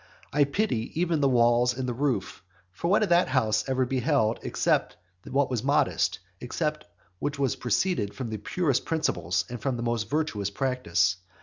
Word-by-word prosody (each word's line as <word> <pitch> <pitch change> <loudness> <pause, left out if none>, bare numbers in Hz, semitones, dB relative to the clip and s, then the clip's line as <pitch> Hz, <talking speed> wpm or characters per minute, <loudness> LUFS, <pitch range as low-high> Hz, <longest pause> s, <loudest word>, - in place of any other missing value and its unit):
I 145 0 +4
pity 140 - -1
even 170 -3 +1
the 140 - +4
walls 120 0 +3
and 130 -1 -2
the 125 - -1
roof. 135 - -2 0.3
For 95 - -4
what 200 +4 +4
had 210 - 0
that 175 +1 +4
house 110 -5 +1
ever 130 -1 +1
beheld 120 -3 +1
except - - 0 0.3
what 135 0 +1
was 120 -3 -1
modest, 140 +2 +2 0.2
except - - -3 0.3
what 140 -1 -2 0.2
proceeded 120 - 0
from 125 -4 -5
the 110 - -3
purest 140 - 0
principles 90 - 0
and 120 -1 -7
from 135 -3 -1
the 120 - -4
most 115 -2 -1
virtuous 130 -10 -1
practice? 100 -7 0
125 Hz, 170 wpm, -27 LUFS, 110-145 Hz, 0.3 s, I